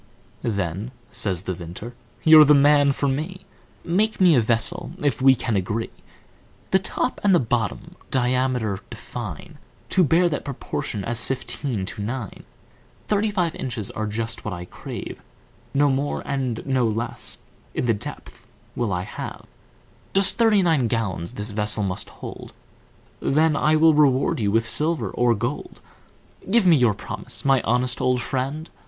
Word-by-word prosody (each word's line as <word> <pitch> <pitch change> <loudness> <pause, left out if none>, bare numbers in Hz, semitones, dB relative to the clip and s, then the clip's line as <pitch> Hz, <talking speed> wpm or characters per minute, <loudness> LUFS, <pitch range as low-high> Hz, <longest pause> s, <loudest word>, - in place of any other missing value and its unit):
"Then," 100 0 -2 0.2
says 95 -4 -2
the 95 - -2
Vintner, 90 +7 -8 0.3
"you're 155 -1 +9
the 150 0 +6
man 145 0 +5
for 140 +1 -1
me, 155 +8 -3 0.4
Make 210 +6 +1
me 180 -3 +6
a 125 - +5
vessel, 115 0 -1
if 145 -2 +1
we 135 0 +7
can 115 -3 -2
agree. 105 +4 -2 0.8
The 190 - +5
top 245 +6 -2
and 200 -2 +5
the - - +5
bottom 115 -4 -2
diameter 125 -5 0
define, - - -8 0.3
To 185 - +4
bear 170 +3 +4
that 150 -4 -2
proportion 120 -6 -4
as 120 0 0
fifteen 130 -5 -3
to 105 +2 -6
nine, 115 -1 -5 0.6
Thirty 210 +1 +2
five 180 -5 0
inches 115 -6 -4
are 110 0 -3
just 110 +1 -4
what 105 -4 -3
I 90 0 -7
crave, - - -8 0.5
No 145 +1 +3
more 140 +1 -1
and 130 -5 -2
no 130 -3 +2
less, 115 +2 -1 0.4
in - - 0
the 115 - +3
depth, 105 - -9 0.3
will 120 -4 -1
I 90 -1 -1
have; - - -7 0.7
Just 195 -1 +3
thirty 220 -4 +5
nine 155 -8 +3
gallons 100 -5 -2
this 105 -1 -3
vessel 105 0 +1
must 95 -2 -3
hold, - - -9 0.7
Then 155 +2 +2
I 155 0 +3
will 160 +1 +6
reward 140 -4 +3
you 105 -3 +1
with 115 +2 +2
silver 150 - 0
or 120 -1 +2
gold, 105 - -4 0.7
Give 220 0 +4
me 175 -3 +7
your 120 -7 +3
promise, - - -7
my 135 -2 +4
honest 125 +3 0
old 125 0 +2
friend?" 135 +5 -3
125 Hz, 160 wpm, -23 LUFS, 110-150 Hz, 0.8 s, you're